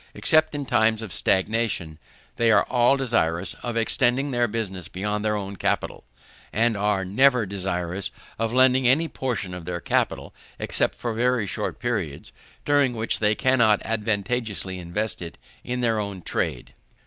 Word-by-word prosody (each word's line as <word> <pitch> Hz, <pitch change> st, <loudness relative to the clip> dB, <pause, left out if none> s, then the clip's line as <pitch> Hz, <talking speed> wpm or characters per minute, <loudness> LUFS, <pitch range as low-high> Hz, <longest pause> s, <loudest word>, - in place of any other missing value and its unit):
Except 155 Hz, -1 st, +3 dB
in 145 Hz, -1 st, -3 dB
times 110 Hz, -2 st, +2 dB
of 105 Hz, -6 st, -6 dB
stagnation, 95 Hz, -6 st, 0 dB, 0.4 s
they 115 Hz, -1 st, +3 dB
are -, -, +5 dB
all 125 Hz, +2 st, +3 dB
desirous 115 Hz, -11 st, 0 dB
of 120 Hz, -1 st, -3 dB
extending 125 Hz, +5 st, +2 dB
their 120 Hz, -1 st, +2 dB
business 100 Hz, -6 st, -4 dB
beyond 105 Hz, +2 st, -3 dB
their 105 Hz, 0 st, +1 dB
own 100 Hz, -1 st, -4 dB
capital, -, -, -2 dB, 0.5 s
and 115 Hz, +1 st, +2 dB
are 105 Hz, -1 st, 0 dB
never 125 Hz, +4 st, +3 dB
desirous 95 Hz, -1 st, -3 dB, 0.3 s
of 115 Hz, 0 st, 0 dB
lending 130 Hz, 0 st, +4 dB
any 150 Hz, +6 st, +3 dB
portion 115 Hz, -, -3 dB
of 90 Hz, -2 st, -7 dB
their 90 Hz, 0 st, -3 dB
capital -, -, -1 dB, 0.2 s
except -, -, 0 dB
for 120 Hz, -2 st, -3 dB
very 120 Hz, -1 st, +1 dB
short 100 Hz, +2 st, -3 dB
periods, 105 Hz, -, -3 dB, 0.3 s
during 145 Hz, -4 st, +3 dB
which 110 Hz, 0 st, -1 dB
they 105 Hz, 0 st, +2 dB
cannot 120 Hz, -5 st, +3 dB
advantageously 105 Hz, -3 st, -2 dB
invest 90 Hz, +5 st, -3 dB
it 85 Hz, -1 st, -7 dB, 0.3 s
in 125 Hz, 0 st, -3 dB
their 115 Hz, -2 st, +1 dB
own 100 Hz, -3 st, -5 dB
trade. -, -, -3 dB
110 Hz, 155 wpm, -24 LUFS, 95-125 Hz, 0.5 s, are